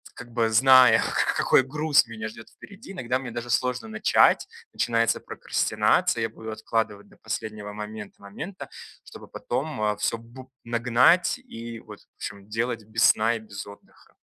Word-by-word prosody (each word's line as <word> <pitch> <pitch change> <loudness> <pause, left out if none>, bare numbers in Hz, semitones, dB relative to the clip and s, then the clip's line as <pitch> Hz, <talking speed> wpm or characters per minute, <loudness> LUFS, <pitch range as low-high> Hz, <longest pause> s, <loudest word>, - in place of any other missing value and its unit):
как 120 -2 -11
бы, 115 -1 +1
зная, 130 0 +7
ка - - 0
какой - - +4
груз 145 0 +2
меня 110 -1 -6
ждёт 110 +1 -13
впереди, 200 +1 -13
иногда 130 -8 -2
мне 130 -2 -7
даже 120 +1 -6
сложно 125 -1 0
начать. 110 0 +3 0.3
Начинается 115 -1 +1
прокрастинация, 115 - 0
я 115 - -1
буду 110 0 -10
откладывать 110 -2 -3
до - - -21
последнего 110 -1 -5
момент 105 0 -8
момента, 135 - -8 0.3
чтобы - - -13
потом, 160 - -4
а, 105 0 +1
всё - - -1
бу 125 +3 -14
нагнать 125 - +3
и, 115 - -9
вот, - - -12
в - - -29
общем, 100 0 -8
делать 115 0 -2
без 110 +1 -1
сна 115 +2 +4
и - - -4
без 105 -2 -9
отдыха. 100 0 -17
115 Hz, 165 wpm, -25 LUFS, 110-125 Hz, 0.3 s, зная